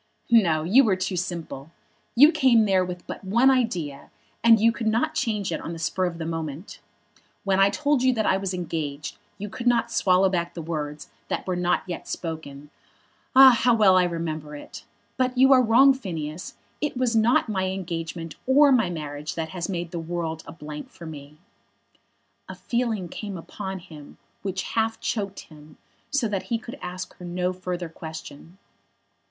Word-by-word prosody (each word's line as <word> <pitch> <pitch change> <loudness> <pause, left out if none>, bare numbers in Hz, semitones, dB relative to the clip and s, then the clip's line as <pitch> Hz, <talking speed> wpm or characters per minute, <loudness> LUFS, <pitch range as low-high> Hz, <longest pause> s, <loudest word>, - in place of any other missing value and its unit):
"No; 170 -9 +4
you 220 +12 +5
were 210 -6 +3
too 185 0 -3
simple. 170 -5 -5 0.5
You 290 +6 +8
came 255 -8 +4
there 190 -2 +3
with 180 -1 -6
but - - -7
one 235 +8 +4
idea, 180 - -1 0.3
and 230 -1 +7
you 230 +2 +5
could 230 -1 -4
not 235 +9 +1
change 215 - -1
it - - -3
on 165 - -5
the - - -6
spur 170 +3 -1
of 175 -2 -3
the 165 - -4
moment. 160 +1 -5 0.6
When 195 -1 +1
I 195 0 +6
told 290 +2 +1
you 260 0 +4
that 220 -3 0
I - - +3
was 195 -1 -2
engaged 160 -4 -4 0.2
you 205 +1 -5
could 235 +4 -5
not 235 -1 +2
swallow 185 -2 +3
back 175 -2 -2
the 170 - -5
words 150 -2 -5 0.2
that - - -3
were 185 - -1
not 180 0 +1
yet 180 -2 -6
spoken. 150 -3 -6 0.6
Ah, 265 0 +10
how 240 0 +3
well 205 -4 +5
I 185 -1 +5
remember 160 -3 -4
it. 145 - -10 0.3
But 255 0 0
you 265 +2 +7
are 255 - +6
wrong, 250 +4 +6
Phineas. 165 - -6 0.3
It 295 -3 -2
was 250 -2 +1
not 225 +3 +3
my 190 -3 -1
engagement 165 -3 -4
or 280 +2 +6
my 230 -8 +3
marriage 150 -3 -5
that 160 -1 -3
has 175 +1 -4
made 175 -3 -3
the 170 - -4
world 165 -1 -4
a - - -7
blank 150 -2 -8
for 170 - -12
me." 150 -1 -10 1.1
A - - -6
feeling 230 -6 -2
came 200 +2 -6
upon 190 +3 -6
him 160 -5 -13 0.2
which 190 -1 -3
half 225 0 0
choked 200 -3 -3
him, 150 -1 -16 0.3
so 280 -5 +1
that 200 -3 -2
he 235 - +1
could 240 +3 -10
ask 180 +1 -6
her - - -12
no 180 +1 -2
further 180 -1 -4
question. 160 +1 -10
185 Hz, 185 wpm, -25 LUFS, 165-225 Hz, 1.1 s, Ah